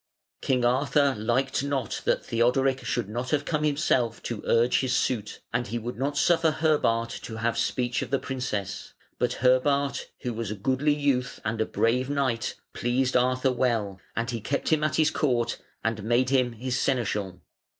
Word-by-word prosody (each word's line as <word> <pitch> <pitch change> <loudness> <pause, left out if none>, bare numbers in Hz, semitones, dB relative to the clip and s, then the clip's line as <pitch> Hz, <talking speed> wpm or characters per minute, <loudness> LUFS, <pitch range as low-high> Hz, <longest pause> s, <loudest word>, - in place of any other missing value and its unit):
King 125 -2 +1
Arthur 140 +3 +3
liked 125 +5 0
not 140 -6 -2
that - - +1
Theodoric 130 +3 +2
should 120 - -1
not 120 +4 -4
have 145 -2 0
come 155 -2 -1
himself 140 -6 +1
to 115 -4 -4
urge 120 +2 +3
his 130 -1 0
suit, 110 -5 -1
and 120 0 0
he 115 +4 -3
would 120 +2 -5
not 140 +3 -2
suffer 165 +1 +4
Herbart 145 -8 +1
to 110 - -7
have 115 +1 0
speech 120 0 0
of - - -4
the 135 - +2
princess; 125 -8 -4 0.2
but - - -1
Herbart, 140 +2 +2
who 125 - -3
was 115 -2 -4
a 105 - -3
goodly 130 +8 +1
youth 140 -4 0
and 110 0 -1
a 110 - 0
brave 125 +3 +1
knight, 135 -5 -1 0.2
pleased 125 +2 0
Arthur 130 +1 +3
well, 115 -6 0
and 115 +1 -1
he 115 -2 -4
kept 140 +6 -1
him 155 -1 +2
at 155 - +1
his 160 0 +3
court 125 -7 0 0.2
and 115 -1 -1
made 120 +4 +2
him 125 -3 +2
his 125 +2 -2
seneschal. 105 -9 -1
125 Hz, 180 wpm, -27 LUFS, 115-135 Hz, 0.2 s, suffer